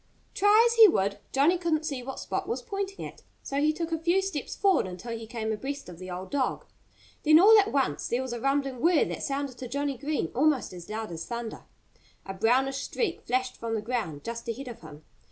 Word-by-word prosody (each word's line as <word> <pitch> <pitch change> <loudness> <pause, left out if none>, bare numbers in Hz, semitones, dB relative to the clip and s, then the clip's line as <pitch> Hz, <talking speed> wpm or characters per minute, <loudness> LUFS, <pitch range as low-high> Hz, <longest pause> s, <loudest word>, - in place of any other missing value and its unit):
Try 415 +3 +5
as 470 0 -1
he 445 -1 +11
would, 200 - 0
Johnnie 310 +7 +3
couldn't 320 -3 0
see 275 -4 -3
what 265 +2 -6
Spot 385 -1 -3
was 460 - -2
pointing 395 -2 -4
at. - - -10 0.2
So 275 - -4
he 305 +1 +4
took 330 +1 -4
a 325 - 0
few 345 +4 +2
steps 380 -7 -4
forward 385 - +3
until 185 +6 -6
he 225 -1 -8
came 220 -1 -3
abreast 270 +3 -5
of 170 -2 -11
the 185 0 -8
old 185 +1 -6
dog. 275 -2 -1 0.6
Then 310 +1 +7
all 425 +5 +8
at 410 +1 +1
once 275 -2 0
there 245 +2 0
was 260 -2 -5
a 240 - -5
rumbling 275 -2 0
whir 335 -2 +4
that - - -5
sounded 275 -2 -3
to 255 - -5
Johnnie 280 0 -2
Green 290 - -2
almost 275 -4 +2
as 175 -1 -10
loud 220 -2 -4
as 165 -1 -6
thunder. 235 -2 -6 0.6
A 195 - -5
brownish 255 +7 +2
streak 415 -8 -2
flashed 255 +1 0
from 230 -1 -3
the 215 - -2
ground 215 -12 -3
just 235 0 -6
ahead 260 +4 -5
of 240 - -8
him. 150 +1 -12
270 Hz, 225 wpm, -28 LUFS, 225-315 Hz, 0.6 s, he